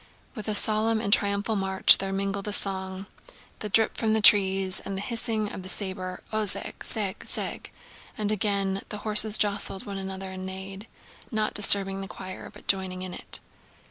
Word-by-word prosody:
With 215 Hz, -4 st, -7 dB
a 215 Hz, -, 0 dB
solemn 220 Hz, 0 st, +2 dB
triumphal 205 Hz, +1 st, +1 dB
march 190 Hz, -1 st, +4 dB
there 195 Hz, 0 st, -3 dB
mingled 195 Hz, +1 st, -3 dB
a -, -, -2 dB
song, 190 Hz, -1 st, -3 dB, 0.5 s
the 210 Hz, -, -5 dB
drip 220 Hz, +2 st, +2 dB
from 220 Hz, -1 st, 0 dB
the 220 Hz, -, +2 dB
trees, 195 Hz, -2 st, +5 dB
and 195 Hz, -, -6 dB
the -, -, -4 dB
hissing 225 Hz, -2 st, -2 dB
of -, -, -7 dB
the 185 Hz, -, -10 dB
saber, 185 Hz, -2 st, -5 dB
"Ozheg 215 Hz, -2 st, -1 dB
zheg 205 Hz, -4 st, 0 dB
zheg..." -, -, -4 dB, 0.5 s
and 210 Hz, -1 st, -1 dB
again 200 Hz, -2 st, -1 dB
the 210 Hz, -, -5 dB
horses 215 Hz, 0 st, +6 dB
jostled 205 Hz, +1 st, 0 dB
one 200 Hz, -2 st, -6 dB
another 190 Hz, 0 st, -6 dB
and 185 Hz, 0 st, -7 dB
neighed, 190 Hz, +2 st, -8 dB, 0.4 s
not 215 Hz, -1 st, -2 dB
disturbing 195 Hz, -1 st, +5 dB
the 195 Hz, -, -6 dB
choir 185 Hz, -1 st, -9 dB
but -, -, -16 dB
joining 185 Hz, -1 st, 0 dB
in 185 Hz, -1 st, -6 dB
it. -, -, -2 dB
200 Hz, 175 wpm, -26 LUFS, 190-210 Hz, 0.5 s, horses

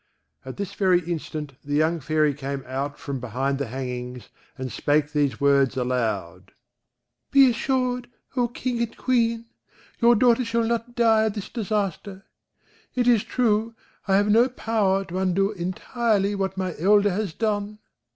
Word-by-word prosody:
At 130 Hz, -1 st, -8 dB
this 200 Hz, -1 st, -4 dB
very 185 Hz, -3 st, +3 dB
instant 155 Hz, -4 st, -5 dB
the 145 Hz, 0 st, -2 dB
young 160 Hz, +3 st, +2 dB
Fairy 155 Hz, 0 st, +1 dB
came 140 Hz, -1 st, -5 dB
out 140 Hz, +3 st, -4 dB
from 140 Hz, -2 st, -5 dB
behind 130 Hz, +4 st, -2 dB
the 140 Hz, -, -2 dB
hangings, 125 Hz, 0 st, -6 dB, 0.3 s
and 130 Hz, -1 st, -5 dB
spake 145 Hz, +5 st, +1 dB
these 145 Hz, -6 st, 0 dB
words 140 Hz, -2 st, +3 dB
aloud: 110 Hz, -8 st, -2 dB, 0.8 s
"Be 275 Hz, -1 st, +6 dB
reassured, 250 Hz, 0 st, 0 dB, 0.3 s
O 245 Hz, -2 st, +2 dB
King 240 Hz, 0 st, -3 dB
and 235 Hz, -1 st, -3 dB
Queen; 230 Hz, -2 st, +1 dB, 0.5 s
your 235 Hz, 0 st, +5 dB
daughter 240 Hz, +2 st, +4 dB
shall 230 Hz, 0 st, 0 dB
not 235 Hz, +1 st, -2 dB
die 225 Hz, -2 st, +4 dB
of 215 Hz, -, -1 dB
this 205 Hz, -3 st, -6 dB
disaster: 200 Hz, -3 st, -3 dB, 0.7 s
it 245 Hz, -1 st, +1 dB
is 235 Hz, -4 st, +4 dB
true, 225 Hz, -2 st, 0 dB, 0.3 s
I 195 Hz, -, +3 dB
have 205 Hz, +1 st, +3 dB
no 235 Hz, +4 st, +5 dB
power 205 Hz, -5 st, 0 dB
to 180 Hz, +1 st, -4 dB
undo 190 Hz, +2 st, +1 dB
intirely 200 Hz, +2 st, -1 dB
what 195 Hz, -1 st, -2 dB
my 185 Hz, -2 st, -2 dB
elder 205 Hz, +3 st, +4 dB
has 200 Hz, 0 st, -2 dB
done. 210 Hz, -1 st, -2 dB
195 Hz, 155 wpm, -24 LUFS, 140-230 Hz, 0.8 s, Be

